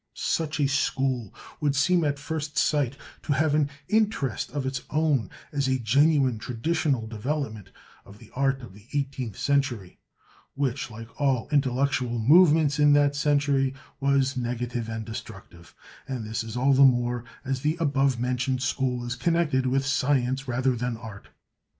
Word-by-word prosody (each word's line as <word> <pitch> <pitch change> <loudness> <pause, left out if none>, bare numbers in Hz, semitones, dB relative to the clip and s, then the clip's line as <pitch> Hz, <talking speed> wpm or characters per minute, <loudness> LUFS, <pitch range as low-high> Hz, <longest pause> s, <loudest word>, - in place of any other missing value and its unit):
Such 160 -2 -1
a 145 - +3
school 135 -4 0 0.3
would 145 -2 +1
seem 170 +5 +3
at 145 -1 0
first 150 0 -5
sight 140 -3 +1 0.2
to 145 - -1
have 150 +2 +1
an 150 -2 +2 0.2
interest 210 - 0
of 145 -2 -3
its 130 0 -2
own 150 -7 +1 0.2
as 140 -2 0
a 130 0 +2
genuine 135 +1 +3
traditional 130 +1 -1
development 110 - -4 0.3
of 100 +1 -15
the - - -17
art 135 0 0
of 115 - -10
the 105 +3 -17
eighteenth 135 -6 -3
century, 135 -10 -1 0.6
which, 135 0 -2
like 115 +1 -9
all 135 -5 +1
intellectual 130 -3 +1
movements 150 +3 +5
in 145 0 +6
that 145 0 +3
century, 140 -2 +1 0.2
was 140 -1 +2
negative 120 -1 -3
and 110 -1 -4
destructive; 100 -6 -10 0.3
and 125 -5 -4
this 115 +1 -4
all 135 +3 +3
the 135 - +4
more 120 -2 +3 0.2
as 130 -1 -2
the 155 +4 0
above 140 -5 +1
mentioned 125 +1 -1
school 125 -1 -1
is 120 0 -3
connected 150 -3 +1
with 135 +1 +1
science 135 -1 0
rather 125 +1 +1
than 120 0 -3
art. 110 -3 -10
135 Hz, 155 wpm, -26 LUFS, 120-145 Hz, 0.6 s, in